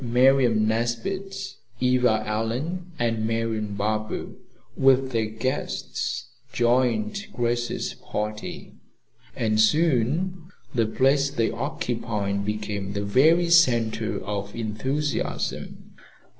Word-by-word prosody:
Miriam 125 -2 +4
Nesbit, 120 - -2 0.2
Eva 125 -3 +3
Allen 130 +12 -2
and 115 -2 0
Marian 110 -2 -1
Barber, 110 +1 -2 0.5
with 135 0 +4
their 115 -2 0
guests, 115 +4 -3 0.3
joined 130 - +1
Grace's 120 0 -1
party, 105 0 -5 0.6
and 110 -1 +1
soon 160 +6 +2 0.3
the 115 -4 +2
place 135 +4 +3
they 115 -4 0
occupied 100 -2 -2
became 105 -1 -3
the 100 0 -2
very 160 +11 +4
center 115 -9 +3
of 100 0 -4
enthusiasm. 130 +7 -3
115 Hz, 90 wpm, -25 LUFS, 110-135 Hz, 0.6 s, Miriam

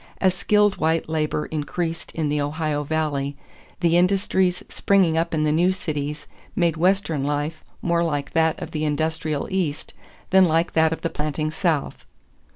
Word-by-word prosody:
As 190 -1 +3
skilled 205 +2 +2
white 160 +1 +1
labor 155 -1 -1
increased 165 +2 -3
in 160 -2 0
the 145 0 0
Ohio 150 0 -1
Valley, 145 -2 -2 0.4
the 170 -1 +4
industries 185 0 +2
springing 190 -5 +2
up 165 +1 0
in 155 -1 0
the 155 - +2
new 175 +4 +3
cities 150 -5 -4 0.3
made 170 -3 +2
Western 170 -4 +1
life 145 +2 -2 0.2
more 170 -1 +2
like 145 -4 -2
that 160 -1 +2
of - - -6
the 155 -1 -2
industrial 155 0 -1
East 175 -6 -2 0.4
than 190 -1 +7
like 165 +1 +1
that 160 0 +4
of 160 - -3
the 165 - -2
planting 155 +1 -2
South. 160 -4 -1
160 Hz, 160 wpm, -23 LUFS, 150-175 Hz, 0.4 s, than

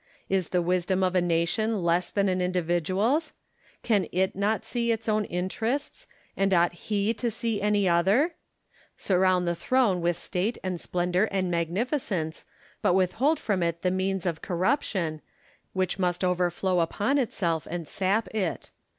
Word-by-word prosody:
Is 190 -3 0
the 180 -1 +1
wisdom 185 +2 +1
of 185 -1 +1
a 180 - +3
nation 175 +5 0
less 175 +1 +1
than 200 -1 +1
an 185 -1 0
individual's? 185 - 0 0.5
Can 210 -5 +2
it 190 +1 0
not 205 +3 0
see 235 -1 0
its 225 0 -2
own 215 -1 +1
interests: 220 - -3 0.3
and 195 0 +1
ought 175 0 +3
he 205 +4 -1
to 235 +1 -2
see 225 -1 -2
any 205 -1 +2
other 175 +6 +4
1 335 +4 0 0.7
Surround 185 -1 +2
the 170 - +2
throne 200 0 +1
with 170 0 +1
state 190 +7 -2
and 185 -3 -3
splendour 180 +3 0
and 185 -2 -1
magnificence, 175 - -2 0.4
but 180 - +3
with 185 -1 +3
hold 300 +3 +3
from 200 -9 -1
it 170 0 -1
the 180 - +2
means 190 0 -1
of 165 -3 -2
corruption, 180 - -1 0.5
which 185 0 -1
must 180 0 0
overflow 180 0 +1
upon 205 - +1
itself 175 - -1
and 170 -2 -4
sap 195 +5 0
it. 195 -6 -2
185 Hz, 160 wpm, -27 LUFS, 175-215 Hz, 0.7 s, other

